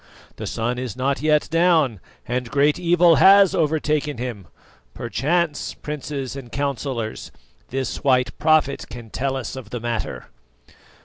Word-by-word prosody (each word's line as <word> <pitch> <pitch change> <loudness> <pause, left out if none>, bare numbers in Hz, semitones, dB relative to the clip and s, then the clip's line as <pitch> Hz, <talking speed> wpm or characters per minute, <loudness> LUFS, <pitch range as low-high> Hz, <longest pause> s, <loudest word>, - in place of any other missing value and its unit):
The - - -5
sun 120 +2 -2
is 125 -2 -5
not 135 +2 0
yet 150 -1 +2
down, 165 - +3 0.3
and 125 0 -2
great 145 +5 +2
evil 175 -1 +4
has 195 0 +7
overtaken 150 -3 0
him. 115 -7 -5 0.5
Perchance, 150 +7 -1
Princes 145 -3 -5
and 130 -4 -9
Councillors, 135 -5 -3 0.4
this 135 0 -3
white 130 -3 +2
prophet 155 -3 +2
can 120 -3 -10
tell 135 0 -2
us 130 -3 -5
of 130 -5 -9
the 120 - -4
matter." 115 -1 -4
140 Hz, 135 wpm, -22 LUFS, 125-155 Hz, 0.5 s, has